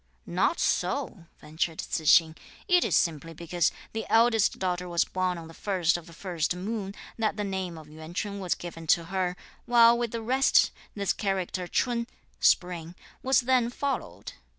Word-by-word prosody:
"Not - - 0
so!" 170 - -1
ventured 160 +1 -3
Tzu 160 - -3
h'sing. 160 +1 +5 0.3
"It 360 -2 +4
is - - +1
simply 165 -1 0
because 170 +1 0 0.2
the 220 0 -4
eldest 225 -2 +4
daughter 180 -1 -2
was 170 -1 +2
born 185 -1 -1
on 165 -1 -9
the 165 - -12
first 180 -2 0
of 175 0 -6
the 170 - -13
first 175 -1 -2
moon, 200 +1 -4 0.2
that 215 -2 0
the 210 - -1
name 190 -4 -3
of 155 -1 -11
Yuan 155 +2 -11
Ch'un 200 0 -3
was 185 -3 -1
given 165 -2 -9
to 170 - +4
her; 180 -1 -1 0.3
while 235 -1 +7
with 235 0 -1
the 230 0 -5
rest 260 +4 +3 0.2
this 200 -2 0
character 185 -2 -2
Ch'un 235 +3 0 0.3
(spring) 175 -1 +1 0.3
was 265 -1 +3
then 250 -1 +2
followed. 235 - -4
185 Hz, 175 wpm, -27 LUFS, 170-225 Hz, 0.3 s, while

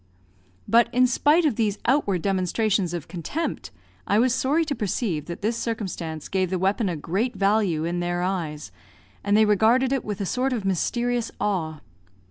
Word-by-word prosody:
But, 235 +1 +4
in 250 +1 +4
spite 295 +7 +3
of 285 -8 +1
these 210 -3 0
outward 210 - +1
demonstrations 195 0 0
of 175 -4 -5
contempt, 185 - -4 0.4
I 205 - +3
was 240 +2 +3
sorry 295 +6 +1
to 300 - -2
perceive 195 - -2
that 170 +2 -8
this 225 +2 +1
circumstance 185 -9 -4
gave 185 -2 0
the 185 - -1
weapon 195 +3 +1
a 175 - -2
great 195 - -2
value, 195 -5 +1
in 175 +1 -2
their 175 0 -1
eyes, 155 - -3 0.5
and 205 +1 +3
they 220 - +6
regarded 225 +5 +3
it 270 - -1
with 210 -2 -4
a 200 - -2
sort 255 +6 0
of 220 -5 -3
mysterious 235 +5 0
awe. 170 -7 -2
205 Hz, 175 wpm, -24 LUFS, 175-240 Hz, 0.5 s, they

